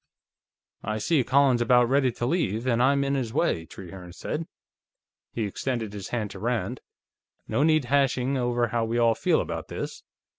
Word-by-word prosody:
"I 110 Hz, +1 st, -2 dB
see 135 Hz, +6 st, +2 dB
Colin's 130 Hz, -1 st, +3 dB
about 120 Hz, 0 st, +4 dB
ready 135 Hz, 0 st, +3 dB
to 120 Hz, -, -3 dB
leave, 120 Hz, -, 0 dB
and 120 Hz, -2 st, +2 dB
I'm 140 Hz, +2 st, +3 dB
in 140 Hz, 0 st, 0 dB
his 125 Hz, -5 st, -2 dB
way," 85 Hz, -, 0 dB
Trehearne 90 Hz, -1 st, -10 dB
said. 155 Hz, -, -4 dB, 0.8 s
He 115 Hz, -, -2 dB
extended 110 Hz, +1 st, -3 dB
his 100 Hz, -3 st, -6 dB
hand 110 Hz, -4 st, -3 dB
to -, -, -9 dB
Rand. 120 Hz, 0 st, -2 dB, 0.7 s
"No -, -, 0 dB
need 155 Hz, -2 st, +3 dB
hashing 135 Hz, 0 st, +1 dB
over 120 Hz, -2 st, 0 dB
how 115 Hz, 0 st, 0 dB
we 115 Hz, +1 st, -1 dB
all 115 Hz, -1 st, +4 dB
feel -, -, +2 dB
about -, -, -4 dB
this. -, -, -6 dB
120 Hz, 175 wpm, -26 LUFS, 110-135 Hz, 0.8 s, about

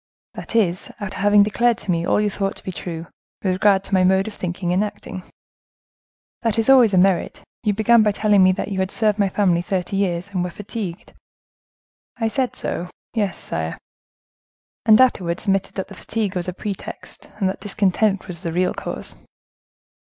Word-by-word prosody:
"That -, -, -8 dB
is, 185 Hz, -6 st, +1 dB
after 205 Hz, -1 st, -5 dB
having 205 Hz, 0 st, +5 dB
declared 235 Hz, +3 st, +2 dB
to 190 Hz, -, -3 dB
me 170 Hz, 0 st, 0 dB
all -, -, +3 dB
you 210 Hz, -1 st, +1 dB
thought 195 Hz, 0 st, -2 dB
to -, -, -12 dB
be 190 Hz, -, -4 dB
true, 170 Hz, -2 st, -6 dB, 0.4 s
with 190 Hz, -2 st, +2 dB
regard 195 Hz, 0 st, +3 dB
to 195 Hz, -, -8 dB
my 185 Hz, -1 st, +4 dB
mode 190 Hz, +2 st, +3 dB
of 220 Hz, -, -6 dB
thinking 180 Hz, -1 st, -3 dB
and 190 Hz, +3 st, +2 dB
acting. 205 Hz, -2 st, -6 dB, 1.2 s
That 230 Hz, -2 st, 0 dB
is 225 Hz, +4 st, +5 dB
always 240 Hz, -7 st, +6 dB
a -, -, +3 dB
merit. 185 Hz, -1 st, +2 dB, 0.2 s
You 210 Hz, -3 st, +1 dB
began 225 Hz, +2 st, +5 dB
by 210 Hz, -1 st, +3 dB
telling 205 Hz, -1 st, +3 dB
me 185 Hz, 0 st, +6 dB
that 185 Hz, -, -4 dB
you 195 Hz, -2 st, -3 dB
had 190 Hz, 0 st, 0 dB
served 215 Hz, -1 st, +1 dB
my 200 Hz, -1 st, +3 dB
family 180 Hz, -3 st, +2 dB
thirty 190 Hz, 0 st, -2 dB
years, 180 Hz, -1 st, -1 dB
and 185 Hz, -3 st, -1 dB
were 180 Hz, -, -2 dB
fatigued." 200 Hz, -1 st, -7 dB, 1.0 s
"I 225 Hz, -1 st, 0 dB
said 255 Hz, +1 st, -1 dB
so; 175 Hz, +1 st, -3 dB, 0.2 s
yes, 205 Hz, -5 st, -1 dB
sire." 80 Hz, 0 st, -4 dB, 1.1 s
"And 215 Hz, -1 st, +8 dB
you 260 Hz, -, +8 dB
afterwards 175 Hz, -8 st, -3 dB
admitted 195 Hz, -1 st, 0 dB
that 190 Hz, -, -3 dB
that -, -, -11 dB
fatigue 210 Hz, -4 st, -3 dB
was 180 Hz, -1 st, -2 dB
a 180 Hz, -, -2 dB
pretext, 200 Hz, +1 st, -7 dB
and 195 Hz, -, +1 dB
that 190 Hz, -, -3 dB
discontent 200 Hz, 0 st, +1 dB
was 175 Hz, -3 st, -5 dB
the 165 Hz, -, -4 dB
real 180 Hz, +2 st, +1 dB
cause." -, -, -4 dB
195 Hz, 195 wpm, -21 LUFS, 180-210 Hz, 1.2 s, And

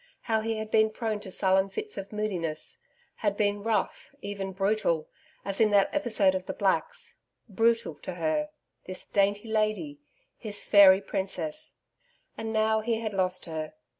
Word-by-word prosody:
How 220 Hz, -2 st, 0 dB
he 225 Hz, 0 st, -2 dB
had 215 Hz, 0 st, -5 dB
been 220 Hz, 0 st, +4 dB
prone 215 Hz, -1 st, -3 dB
to 205 Hz, -, -9 dB
sullen 190 Hz, 0 st, +2 dB
fits 425 Hz, -, -5 dB
of 195 Hz, -, -7 dB
moodiness; 180 Hz, -8 st, -3 dB, 0.4 s
had 205 Hz, -2 st, -1 dB
been 205 Hz, -1 st, +1 dB
rough, 225 Hz, +5 st, -2 dB
even 200 Hz, -4 st, -5 dB
brutal, 195 Hz, -4 st, 0 dB, 0.4 s
as 195 Hz, +2 st, -1 dB
in 220 Hz, -, +5 dB
that 200 Hz, -1 st, +3 dB
episode 230 Hz, -10 st, +2 dB
of 185 Hz, 0 st, -4 dB
the -, -, -3 dB
Blacks.... 195 Hz, -2 st, -1 dB, 0.3 s
Brutal 230 Hz, -2 st, +1 dB
to 185 Hz, -, -6 dB
her 175 Hz, -, 0 dB, 0.4 s
this 185 Hz, 0 st, -3 dB
dainty 205 Hz, +2 st, +1 dB
lady, 220 Hz, +7 st, -1 dB, 0.4 s
his 210 Hz, -3 st, -5 dB
fairy 195 Hz, -2 st, +7 dB
princess!... 190 Hz, -5 st, -4 dB, 0.6 s
And 225 Hz, 0 st, -4 dB
now 220 Hz, 0 st, +2 dB
he 225 Hz, 0 st, -1 dB
had 215 Hz, -2 st, -3 dB
lost 185 Hz, -1 st, +1 dB
her. 155 Hz, -2 st, -5 dB
205 Hz, 160 wpm, -28 LUFS, 190-220 Hz, 0.6 s, fairy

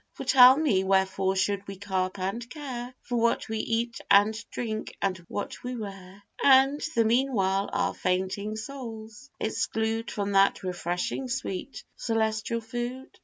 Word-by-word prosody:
For -, -, -7 dB
tell 255 Hz, 0 st, +8 dB
me, 250 Hz, -12 st, +2 dB
wherefore 190 Hz, 0 st, +1 dB
should 200 Hz, +1 st, 0 dB
we 195 Hz, -, -6 dB
carp 190 Hz, -1 st, -2 dB
and 200 Hz, +6 st, -3 dB
care 250 Hz, -4 st, -6 dB
For 245 Hz, -, -2 dB
what 230 Hz, 0 st, +1 dB
we 220 Hz, 0 st, -3 dB
eat 230 Hz, +1 st, -1 dB
and 205 Hz, +2 st, +6 dB, 0.2 s
drink, 220 Hz, -2 st, -4 dB
and 190 Hz, -2 st, -1 dB
what 205 Hz, -, -5 dB
we 250 Hz, 0 st, -4 dB
wear; 195 Hz, -3 st, -8 dB, 0.2 s
And 270 Hz, +1 st, +6 dB
the 230 Hz, -, +4 dB
meanwhile 220 Hz, -5 st, +1 dB
our -, -, 0 dB
fainting 190 Hz, +3 st, -1 dB
souls 225 Hz, 0 st, -8 dB
exclude 220 Hz, +1 st, -1 dB
From 200 Hz, -1 st, -2 dB
that 195 Hz, 0 st, +3 dB
refreshing 180 Hz, +7 st, -3 dB
sweet 255 Hz, -2 st, -4 dB
celestial 225 Hz, 0 st, -1 dB
food? 240 Hz, +4 st, -6 dB
220 Hz, 145 wpm, -27 LUFS, 195-245 Hz, 0.2 s, tell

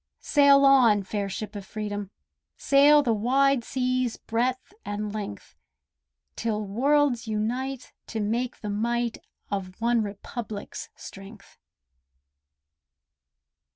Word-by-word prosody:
Sail 280 Hz, -1 st, +5 dB
on, 240 Hz, -7 st, +5 dB
fair 200 Hz, +1 st, -3 dB
ship 210 Hz, +2 st, -6 dB
of 200 Hz, -, -5 dB
Freedom, 205 Hz, -1 st, -5 dB, 0.5 s
sail 290 Hz, +1 st, +5 dB
The 235 Hz, -4 st, +2 dB
wide 260 Hz, +4 st, +2 dB
sea's 255 Hz, -1 st, -1 dB
breadth 250 Hz, -, -2 dB
and 205 Hz, 0 st, -4 dB
length. 205 Hz, -, -7 dB, 0.8 s
'Till 215 Hz, -2 st, -2 dB
worlds 260 Hz, +3 st, +1 dB
unite 245 Hz, +5 st, -3 dB
to 225 Hz, -, -4 dB
make 235 Hz, +4 st, -2 dB
the 210 Hz, -, -4 dB
might 235 Hz, +2 st, -1 dB, 0.3 s
Of 185 Hz, -2 st, -4 dB
"One 235 Hz, 0 st, +2 dB
Republic's" 210 Hz, +1 st, -6 dB
strength. 195 Hz, +1 st, -12 dB
225 Hz, 105 wpm, -26 LUFS, 205-255 Hz, 0.8 s, Sail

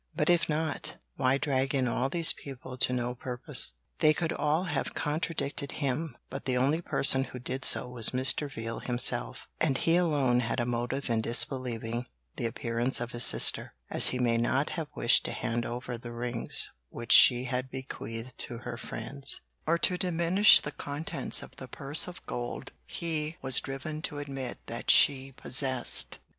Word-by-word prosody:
But -, -, +2 dB
if 170 Hz, -2 st, +1 dB
not, 155 Hz, +1 st, -2 dB, 0.2 s
why 130 Hz, 0 st, +1 dB
drag 135 Hz, -1 st, -1 dB
in 130 Hz, -2 st, +1 dB
all 125 Hz, +2 st, -1 dB
these 165 Hz, +2 st, +5 dB
people 130 Hz, -2 st, -10 dB
to 125 Hz, -, +1 dB
no 125 Hz, -1 st, -2 dB
purpose? 120 Hz, -, -3 dB, 0.3 s
They 155 Hz, 0 st, +4 dB
could 165 Hz, +1 st, -2 dB
all 155 Hz, +4 st, 0 dB
have 185 Hz, -, -3 dB
contradicted 150 Hz, -2 st, -3 dB
him, 140 Hz, -1 st, -3 dB
but 135 Hz, +1 st, -7 dB
the 130 Hz, -1 st, 0 dB
only 140 Hz, +6 st, +1 dB
person 135 Hz, -5 st, +2 dB
who 130 Hz, -, -10 dB
did 130 Hz, +2 st, -5 dB
so -, -, +5 dB
was 120 Hz, -3 st, 0 dB
Mr. 130 Hz, +3 st, +1 dB
Veal 115 Hz, -1 st, -6 dB
himself, 120 Hz, 0 st, -1 dB
and 140 Hz, -4 st, +1 dB
he 165 Hz, +4 st, +2 dB
alone 145 Hz, -8 st, +2 dB
had 120 Hz, +1 st, -2 dB
a 120 Hz, -, 0 dB
motive 120 Hz, +3 st, -3 dB
in 115 Hz, -1 st, +1 dB
disbelieving 120 Hz, 0 st, 0 dB, 0.3 s
the 115 Hz, -, -2 dB
appearance 115 Hz, +2 st, 0 dB
of 120 Hz, 0 st, -5 dB
his 120 Hz, -, 0 dB
sister, -, -, +4 dB, 0.2 s
as -, -, +4 dB
he 130 Hz, -, -3 dB
may 120 Hz, -2 st, +1 dB
not 130 Hz, +5 st, 0 dB
have 165 Hz, -3 st, -4 dB
wished 120 Hz, -, +4 dB
to -, -, -3 dB
hand 120 Hz, 0 st, -3 dB
over 120 Hz, 0 st, -6 dB
the 120 Hz, 0 st, -9 dB
rings 120 Hz, 0 st, +1 dB, 0.2 s
which 120 Hz, -, -7 dB
she 125 Hz, -1 st, +7 dB
had 130 Hz, +1 st, -3 dB
bequeathed 125 Hz, -2 st, -7 dB
to 120 Hz, -, -5 dB
her 120 Hz, 0 st, -7 dB
friends, 135 Hz, +4 st, -3 dB, 0.3 s
or 170 Hz, +2 st, +2 dB
to 180 Hz, +1 st, 0 dB
diminish 180 Hz, +3 st, +5 dB
the -, -, -5 dB
contents 145 Hz, +2 st, -1 dB
of -, -, -14 dB
the -, -, -9 dB
purse -, -, +2 dB
of -, -, -10 dB
gold -, -, -6 dB, 0.2 s
he 160 Hz, -1 st, -3 dB
was 130 Hz, -2 st, +4 dB
driven 145 Hz, +3 st, -6 dB
to 150 Hz, -, -5 dB
admit 135 Hz, -3 st, -6 dB
that -, -, -6 dB
she 135 Hz, -1 st, +5 dB
possessed. 130 Hz, -1 st, +2 dB
130 Hz, 175 wpm, -28 LUFS, 120-150 Hz, 0.3 s, she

